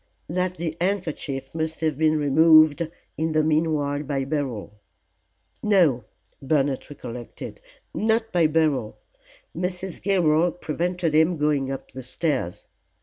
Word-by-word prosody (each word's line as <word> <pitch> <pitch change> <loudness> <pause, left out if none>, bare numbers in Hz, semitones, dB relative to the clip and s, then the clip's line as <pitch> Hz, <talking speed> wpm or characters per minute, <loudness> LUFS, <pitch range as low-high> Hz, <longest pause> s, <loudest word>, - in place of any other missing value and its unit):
"That 180 +2 -1
the 160 -1 -3
handkerchief 160 -8 -2
must 160 0 -3
have 155 -2 +1
been 155 +1 +2
removed 155 +2 +5 0.3
in 160 0 -1
the 155 0 +3
meanwhile 150 -2 +1
by 140 -2 -2
Beryl. 130 -8 -4 0.8
No," 175 - +3 0.4
Bernard 140 -1 0
recollected, 120 -4 -8 0.3
"not 225 +1 +1
by 170 -3 +4
Beryl; 150 -8 0 0.6
Mrs. 180 +1 -3
Gilroy 175 -3 +3
prevented 175 0 -2
him 160 +2 +3
going 145 -3 +1
up 135 -1 -6
the 130 - -7
stairs. 130 - -2
155 Hz, 120 wpm, -24 LUFS, 140-170 Hz, 0.8 s, removed